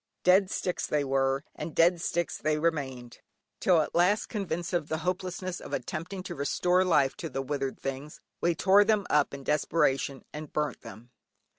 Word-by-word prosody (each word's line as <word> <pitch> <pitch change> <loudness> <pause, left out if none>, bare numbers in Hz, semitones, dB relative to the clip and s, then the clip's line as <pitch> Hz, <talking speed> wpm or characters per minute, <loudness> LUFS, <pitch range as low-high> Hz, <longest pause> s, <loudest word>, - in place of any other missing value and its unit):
Dead 185 +1 +5
sticks 180 -2 -2
they 150 -1 +1
were, 135 0 +1
and 155 +1 -7
dead 170 +1 +4
sticks 175 -1 -1
they 155 0 +1
remained, 135 -7 -2 0.4
till 175 -4 +4
at - - -4
last 180 +5 +2
convinced 175 -4 -3
of 170 -4 0
the 160 - -1
hopelessness 185 0 -3
of - - -9
attempting 180 +4 -4
to - - -6
restore 180 +6 +1
life 150 -7 +3
to 165 - -6
the 135 0 -3
withered 135 -1 -3
things, 135 +2 -6 0.2
we 170 -1 +2
tore 195 +4 +5
them 210 -2 +2
up 150 -1 +3
in 140 0 -8
desperation 140 -2 0
and 150 0 -7
burnt 150 -5 -2
them. 120 +3 -12
160 Hz, 175 wpm, -28 LUFS, 140-180 Hz, 0.4 s, Dead